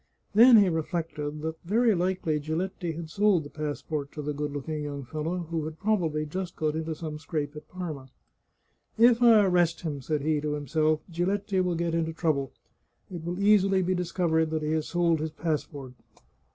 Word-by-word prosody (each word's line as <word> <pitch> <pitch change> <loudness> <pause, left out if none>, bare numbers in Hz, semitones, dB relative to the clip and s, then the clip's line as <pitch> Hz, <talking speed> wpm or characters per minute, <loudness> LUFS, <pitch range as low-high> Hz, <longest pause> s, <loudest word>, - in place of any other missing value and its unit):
Then 235 +3 +8
he 205 -2 +6
reflected 160 -3 -3
that 160 0 -4
very 220 +5 +3
likely 180 -4 0
Giletti 165 +3 -3
had 160 0 -7
sold 200 -4 +3
the 145 - -11
pass 150 -2 -4
port 145 -3 -4
to 150 - -6
the 150 +1 -2
good 145 0 -3
looking 150 +2 -4
young 145 -1 -5
fellow, 160 +6 -3
who 165 -2 -1
had 155 0 -6
probably 170 -8 0
just 180 +3 -5
got 155 -1 -1
into 160 0 -3
some 155 -1 -6
scrape 150 -1 -4
at 150 0 -10
Parma. 155 -8 -6 0.5
" - - -46
If 235 +1 +5
I 225 -4 +7
arrest 175 -3 +2
him," 150 -5 -4
said 150 +2 -1
he 150 0 0
to 150 0 -2
himself, 155 +1 0
" - - -17
Giletti 190 +3 0
will 180 -1 0
get 170 0 -1
into 165 -1 -1
trouJ»le. 150 -5 0 0.7
It 165 - -6
will 175 +2 -4
easily 195 -2 +4
be 185 +1 +1
discovered 170 -3 0
that 155 -1 -2
he 150 - -1
has 155 -1 0
sold 170 -2 +1
his 160 +1 -2
passport. 150 -4 -4
160 Hz, 195 wpm, -27 LUFS, 150-180 Hz, 0.7 s, Then